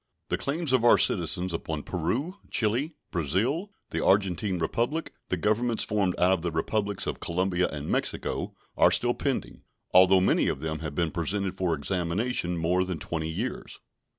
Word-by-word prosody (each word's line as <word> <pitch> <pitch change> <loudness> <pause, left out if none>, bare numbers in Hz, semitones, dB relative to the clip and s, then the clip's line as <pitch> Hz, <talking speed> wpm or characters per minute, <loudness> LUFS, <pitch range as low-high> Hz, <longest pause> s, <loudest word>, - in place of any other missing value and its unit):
The - - 0
claims 145 0 -1
of 130 -3 +3
our 120 - +7
citizens 90 +1 +1
upon 80 -2 -4
Peru, 120 - -2
Chili, 125 +9 +1 0.2
Brazil, 105 - 0 0.2
the - - -1
Argentine 95 0 +2
Republic, 120 - -1 0.2
the 90 - 0
Governments 110 +5 +1
formed 100 -4 0
out 90 +1 +4
of 95 -3 +1
the 85 - -1
Republics 100 +5 -1
of - - -3
Colombia 90 +1 0
and 75 0 -6
Mexico, - - -2 0.2
are - - +6
still - - +3
pending, - - -3 0.3
although 95 +1 +7
many 95 - +3
of - - -1
them 80 +1 -3
have 75 -2 -5
been 85 -1 0
presented 95 +3 -1
for 90 -3 0
examination 90 - -1
more 90 +3 +1
than 90 -2 -3
twenty 80 0 -3
years. 105 +11 -4
95 Hz, 165 wpm, -27 LUFS, 85-110 Hz, 0.3 s, our